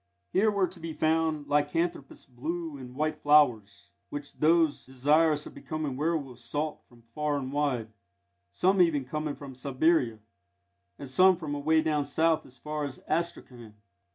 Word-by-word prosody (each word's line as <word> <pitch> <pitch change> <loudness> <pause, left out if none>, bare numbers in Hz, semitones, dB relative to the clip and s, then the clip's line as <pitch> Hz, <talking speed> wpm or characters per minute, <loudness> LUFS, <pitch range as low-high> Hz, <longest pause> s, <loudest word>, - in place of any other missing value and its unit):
Here 215 +3 +4
were 200 -2 +2
to 180 0 -10
be 165 -1 -5
found 155 -1 +1
lycanthropous 145 0 -1
blue 155 +5 -4
and 125 -2 -10
white 155 +2 -1
flowers, 115 -12 +3 0.2
which 145 0 -7
those 160 -1 +2
desirous 150 +4 +2
of - - -10
becoming 155 -4 -4
werwolves 140 -5 -2
sought 150 +5 -3
from 120 -1 -20
far 145 +5 -2
and 135 -1 -5
wide, 135 -6 0 0.6
some 185 - +3
even 150 -6 +2
coming 150 +2 -3
from 140 -2 -9
Siberia, 130 -1 +1 0.8
and 140 - -8
some 185 +7 +5
from 155 -4 -5
away 155 +2 +2
down 150 -2 0
South 160 +3 +1
as 130 - -18
far 150 +2 -4
as 140 -3 -5
Astrakan. 125 -9 -3
150 Hz, 155 wpm, -28 LUFS, 130-160 Hz, 0.8 s, some